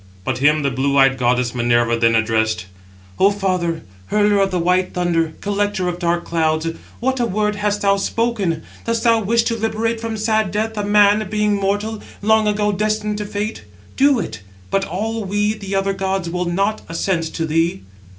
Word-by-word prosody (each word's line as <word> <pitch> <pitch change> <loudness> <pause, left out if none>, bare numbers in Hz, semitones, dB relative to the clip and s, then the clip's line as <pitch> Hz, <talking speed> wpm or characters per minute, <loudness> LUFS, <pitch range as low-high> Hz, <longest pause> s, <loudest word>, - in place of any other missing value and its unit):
But - - -2
him 150 +2 +3
the 140 - +1
blue 140 +2 0
eyed 135 -1 +4
goddess 125 -1 +1
Minerva 120 -1 +2
then 115 0 +3
addressed: 110 -3 +1 0.5
"O 195 - +6
father, 185 -5 -1 0.2
hurler 205 -1 +2
of 195 0 +2
the 185 - -1
white 180 +2 +1
thunder, 165 -3 0
[collector] 205 -2 -1
of 175 0 -3
dark 170 -1 0
clouds, 160 -1 0 0.3
what 260 +2 0
a 240 - +2
word 210 0 -1
hast 205 0 -1
thou 200 0 +3
spoken! 200 -6 -1 0.2
Dost 230 0 -1
thou 230 -1 +4
wish 230 +3 +2
to 230 - -1
liberate 225 +1 -1
from 225 -1 -3
sad 215 -1 +1
death 220 +3 -2
a 210 - -2
man, 205 +1 +4
being 210 0 +1
mortal, 205 +2 -1 0.2
long 220 0 +3
ago 210 0 +1
destined 210 +1 -1
to 210 - -3
fate? 205 +2 -4 0.3
Do 280 0 +4
it: 110 - -5 0.3
but 195 0 +1
all 220 +5 -3
we, 205 +2 0
the 200 -2 -5
other 195 0 +1
gods, 190 -2 -2
will 180 +1 -1
not 195 +5 0
assent 165 0 -1
to 165 - -1
thee." 165 - 0
195 Hz, 185 wpm, -19 LUFS, 165-215 Hz, 0.5 s, O